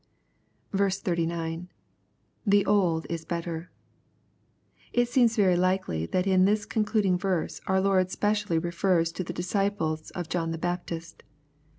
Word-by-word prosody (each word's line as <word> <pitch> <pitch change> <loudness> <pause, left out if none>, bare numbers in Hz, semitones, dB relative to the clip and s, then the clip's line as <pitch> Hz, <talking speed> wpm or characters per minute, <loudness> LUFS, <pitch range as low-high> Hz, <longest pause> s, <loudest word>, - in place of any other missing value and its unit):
39. 170 -3 -1 0.4
— - - -43
[The 205 -1 +5
old 175 -6 +2
is 165 -1 -4
better,] 170 0 -4 1.2
It 245 0 +2
seems 240 -2 +3
very 190 -4 +4
Ukely 180 - 0
that 185 0 +1
in 185 -1 +4
this 210 +1 +2
conchiding 210 -4 +1
verse 185 -4 -1
our 190 0 +3
Lord 190 -1 +2
specially 205 -3 0
refers 170 0 +1
to 185 - -4
the 175 - -5
disciples 175 -3 -1
of 175 -3 -4
John 165 -1 -1
the 165 - -3
Baptist. 170 -1 -4
180 Hz, 130 wpm, -27 LUFS, 165-200 Hz, 1.2 s, The